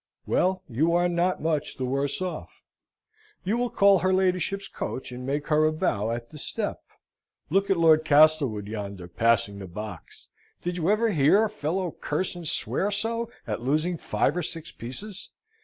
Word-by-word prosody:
Well, 185 0 +1
you 150 +8 +1
are 175 0 +3
not 175 0 0
much 155 -3 -1
the 130 - -2
worse 140 +6 -1
off 185 - -6 0.8
you 200 +5 0
will 245 0 0
call 200 -3 +5
her 185 +2 +1
ladyship's 190 +1 +1
coach, 130 - -5
and 125 +1 -7
make 145 +3 -2
her 155 0 +4
a 155 - +4
bow 110 -8 0
at 115 0 -4
the 155 - -9
step. - - -3 0.7
Look 195 +3 +2
at 195 - +3
Lord 160 -2 +5
Castlewood 145 -8 +4
yonder, 100 -4 -6
passing 100 +1 +1
the 95 - -7
box. 95 -1 -9 0.3
Did 175 0 -2
you 175 0 0
ever 220 +2 +3
hear 160 +6 +4
a 215 - -4
fellow 170 +2 -2
curse 165 +7 -2
and 175 -2 -6
swear 195 +5 0
so 230 +3 -1 0.2
at 110 -1 -3
losing 155 +7 +1
five 150 -1 0
or 180 - 0
six 165 0 -5
pieces? 190 - -8
155 Hz, 175 wpm, -26 LUFS, 130-185 Hz, 0.8 s, call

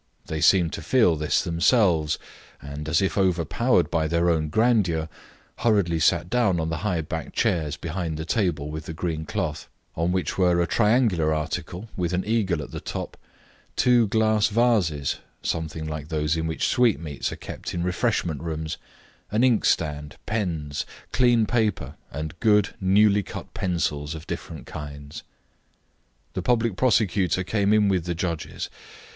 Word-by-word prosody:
They 80 -1 -4
seemed 85 0 +4
to - - -4
feel 90 0 +3
this 75 0 +1
themselves, 85 - +2 0.4
and, 75 +2 -7
as 85 +4 +3
if 95 - 0
overpowered 90 - +2
by 80 -2 +1
their 85 +2 +2
own 80 -2 0
grandeur, 95 -6 +2 0.5
hurriedly 100 -8 +2
sat 85 +1 +3
down 100 -6 +2
on 80 0 -1
the 80 - -1
high 90 -5 -1
backed 80 +1 -6
chairs 80 -10 0
behind 85 0 -3
the 80 - -4
table 80 -7 0
with 80 0 -6
the 80 - -5
green 80 -2 -3
cloth, 90 -8 -3 0.3
on 85 +2 0
which 90 -1 -1
were 90 -2 +4
a 85 - +3
triangular 105 -7 +2
article 85 +6 -3
with 90 -1 -1
an 90 +1 0
eagle 100 -8 0
at - - -10
the - - -5
top, - - -5 0.6
two 120 -3 +4
glass 110 0 +3
vases 105 - +1 0.3
something 80 -1 -3
like 75 -1 -5
those 75 -1 0
in 80 0 -1
which 80 - -1
sweetmeats 85 - +1
are - - -5
kept - - -7
in 85 - -2
refreshment 90 - 0
rooms 80 -1 -4 0.5
an 110 +4 +1
inkstand, 75 - +1
pens, 85 -10 -2 0.3
clean 120 -3 +4
paper, 110 -3 0 0.2
and 75 +2 -5
good, 105 -2 +4
newly 100 +2 +4
cut - - -9
pencils 75 -4 -1
of 80 +1 -9
different 80 -7 -6
kinds. 70 -1 -8 1.1
The - - -2
public 115 -4 +1
prosecutor 100 -6 +2
came 100 +1 +1
in 105 -1 +4
with 95 -4 +1
the 85 -1 -2
judges. 85 -2 -3
85 Hz, 155 wpm, -25 LUFS, 80-105 Hz, 1.1 s, seemed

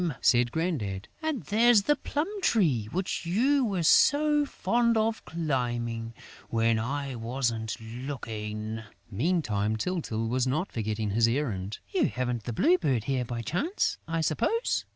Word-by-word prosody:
said 120 -1 +3
Grandad. 130 - -2
"And 315 -7 -2
there's 220 0 +4
the 295 - +3
plum 295 +3 -2
tree 155 - +2
which 180 0 -2
you 260 +10 +3
were 195 -7 0
so 295 - +4
fond 235 -3 +1
of 220 0 0
climbing, 120 -7 -2 0.3
when 115 0 +2
I 140 +4 -3
wasn't 115 -1 -2
looking...." 110 -3 -5 0.3
Meantime, 110 - 0
Tyltyl 115 -7 -2
was 125 +2 0
not 155 +9 -1
forgetting 110 -2 -2
his 115 +3 +3
errand: 110 -7 -2 0.2
"You 370 -5 +3
haven't 125 -3 -3
the 120 - -3
Blue 180 +11 +4
Bird 135 - +1
here 130 0 -1
by 115 0 -4
chance, 250 - -1
I 165 0 -1
suppose?" 300 - 0
130 Hz, 140 wpm, -28 LUFS, 115-185 Hz, 0.3 s, there's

